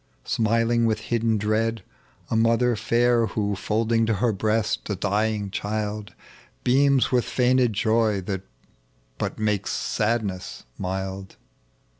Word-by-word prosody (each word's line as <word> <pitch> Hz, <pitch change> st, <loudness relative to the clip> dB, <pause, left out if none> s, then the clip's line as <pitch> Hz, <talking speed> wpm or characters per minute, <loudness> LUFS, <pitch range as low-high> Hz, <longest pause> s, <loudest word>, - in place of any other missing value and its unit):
Smiling 115 Hz, +1 st, +2 dB
with 110 Hz, -1 st, +1 dB, 0.2 s
hidden 115 Hz, -1 st, +2 dB
dread 110 Hz, +1 st, 0 dB, 0.2 s
— -, -, -29 dB
a -, -, +1 dB
mother 115 Hz, +2 st, +3 dB
fair 120 Hz, +1 st, +2 dB
Who 100 Hz, -1 st, -1 dB
folding 115 Hz, +3 st, 0 dB
to 110 Hz, -, +2 dB
her 110 Hz, +3 st, +1 dB
breast 110 Hz, +2 st, -1 dB
a 100 Hz, -, 0 dB
dying 105 Hz, +1 st, -1 dB
child 105 Hz, 0 st, -3 dB, 0.5 s
Beams 135 Hz, +1 st, +3 dB
with 125 Hz, -2 st, +3 dB
feigned 125 Hz, -1 st, +2 dB
joy 110 Hz, -1 st, +2 dB
that 95 Hz, 0 st, -4 dB, 0.8 s
but -, -, -3 dB
makes 105 Hz, -2 st, -1 dB
sadnt^a 105 Hz, -4 st, -2 dB, 0.2 s
mild. 95 Hz, 0 st, -4 dB
110 Hz, 125 wpm, -24 LUFS, 105-115 Hz, 0.8 s, mother